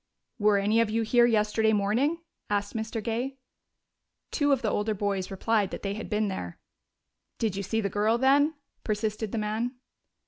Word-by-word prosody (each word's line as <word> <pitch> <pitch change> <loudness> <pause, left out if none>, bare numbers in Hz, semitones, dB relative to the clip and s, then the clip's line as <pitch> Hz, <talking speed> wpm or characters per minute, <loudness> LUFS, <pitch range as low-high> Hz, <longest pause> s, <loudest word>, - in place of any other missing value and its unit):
"Were 210 -1 +4
any 210 +3 +2
of 230 - +1
you 225 +1 0
here 240 +2 +4
yesterday 220 0 +2
morning?" 235 +11 +1 0.3
asked 205 0 -1
Mr. 220 0 -3
Gay. 245 +4 -2 0.9
Two 290 -2 +2
of 270 -3 +2
the 220 - +2
older 210 +1 0
boys 195 -2 -1
replied 205 +1 +1
that - - -7
they 200 -1 -1
had 215 - -6
been 215 0 +1
there. 90 - -5 0.8
"Did 220 -4 -1
you 200 - -2
see 225 +3 -1
the 200 - 0
girl 210 +4 +1
then?" 285 +5 +4 0.3
persisted 215 0 -2
the - - -2
man. 220 +4 -2
215 Hz, 175 wpm, -28 LUFS, 205-230 Hz, 0.9 s, Were